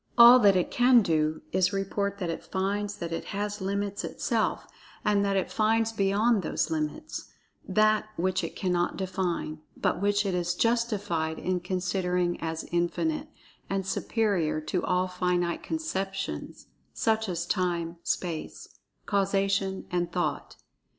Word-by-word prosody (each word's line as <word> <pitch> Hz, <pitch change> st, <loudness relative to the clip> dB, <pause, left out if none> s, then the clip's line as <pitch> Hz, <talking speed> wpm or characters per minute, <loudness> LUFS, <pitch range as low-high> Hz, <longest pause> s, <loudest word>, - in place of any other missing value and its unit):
All 240 Hz, +1 st, +10 dB
that 200 Hz, -4 st, +6 dB
it 180 Hz, -, +1 dB
can 245 Hz, -1 st, +5 dB
do 155 Hz, -2 st, 0 dB
is 185 Hz, -1 st, +3 dB
to 195 Hz, -, -4 dB
report 200 Hz, +1 st, -1 dB
that 180 Hz, -4 st, -2 dB
it -, -, -6 dB
finds 200 Hz, +2 st, -2 dB
that 170 Hz, -1 st, -5 dB
it 165 Hz, -, -3 dB
has 205 Hz, 0 st, -3 dB
limits 200 Hz, +1 st, -2 dB
itself, -, -, -1 dB, 0.4 s
and 205 Hz, -1 st, +3 dB
that 200 Hz, -1 st, +1 dB
it 190 Hz, -, -1 dB
finds 225 Hz, +1 st, +2 dB
beyond 210 Hz, +2 st, +2 dB
those 165 Hz, -, -1 dB
limits 155 Hz, -, -3 dB, 0.4 s
That 215 Hz, +2 st, +3 dB
which 185 Hz, +1 st, 0 dB
it -, -, -5 dB
cannot 175 Hz, -2 st, 0 dB
define, 180 Hz, -4 st, -2 dB, 0.2 s
but -, -, 0 dB
which 205 Hz, +1 st, +2 dB
it 195 Hz, -, 0 dB
is 175 Hz, 0 st, 0 dB
justified 205 Hz, -9 st, 0 dB
in 185 Hz, 0 st, -1 dB
considering 180 Hz, -1 st, -1 dB
as 160 Hz, 0 st, -3 dB
Infinite, 290 Hz, -, 0 dB, 0.4 s
and 195 Hz, -1 st, -1 dB
superior 190 Hz, -5 st, 0 dB
to 180 Hz, +3 st, -2 dB
all 180 Hz, 0 st, +1 dB
finite 180 Hz, -1 st, 0 dB
conceptions, 195 Hz, -12 st, -4 dB, 0.3 s
such 220 Hz, -1 st, +1 dB
as 170 Hz, -1 st, -2 dB
Time, 175 Hz, -2 st, -1 dB
Space, 170 Hz, -3 st, -3 dB, 0.4 s
Causation 195 Hz, -1 st, 0 dB
and 175 Hz, -1 st, -1 dB
Thought. 175 Hz, -3 st, -2 dB
190 Hz, 145 wpm, -28 LUFS, 175-205 Hz, 0.4 s, All